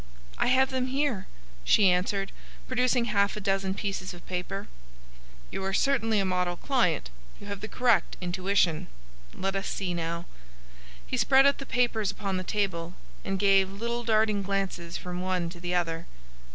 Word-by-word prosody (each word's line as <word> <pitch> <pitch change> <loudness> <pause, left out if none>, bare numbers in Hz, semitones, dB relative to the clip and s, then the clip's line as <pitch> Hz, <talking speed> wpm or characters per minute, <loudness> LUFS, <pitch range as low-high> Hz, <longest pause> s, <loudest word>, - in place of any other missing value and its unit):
"I - - +2
have 260 +2 +4
them 260 -1 0
here," 265 -6 -1 0.4
she 190 - +5
answered, 195 +2 0 0.4
producing 250 -1 +2
half 205 -1 +1
a - - -2
dozen 195 -1 0
pieces 195 -3 -3
of 175 - -14
paper. 185 +2 -4 0.8
"You 195 - -4
are 195 0 -1
certainly 225 -6 +2
a 195 - +1
model 180 -1 0
client. 180 - +1 0.3
You - - -11
have 200 -1 -5
the 215 - -4
correct 230 -6 +2
intuition. 180 -2 +1 0.5
Let 195 +1 -2
us 195 +1 -2
see, 185 -3 -2
now." 170 0 -3 0.8
He - - -2
spread 270 0 +5
out 280 0 +4
the 275 - -7
papers 230 -4 +1
upon 195 -3 -2
the 185 - -2
table, 180 -4 -2 0.3
and 195 - -1
gave 195 -1 +4
little 235 +4 -3
darting 215 -2 +2
glances 195 -3 -2
from 180 0 -5
one 180 -2 -1
to 175 - -10
the 175 +1 -2
other. 165 -1 -1
195 Hz, 165 wpm, -28 LUFS, 180-225 Hz, 0.8 s, she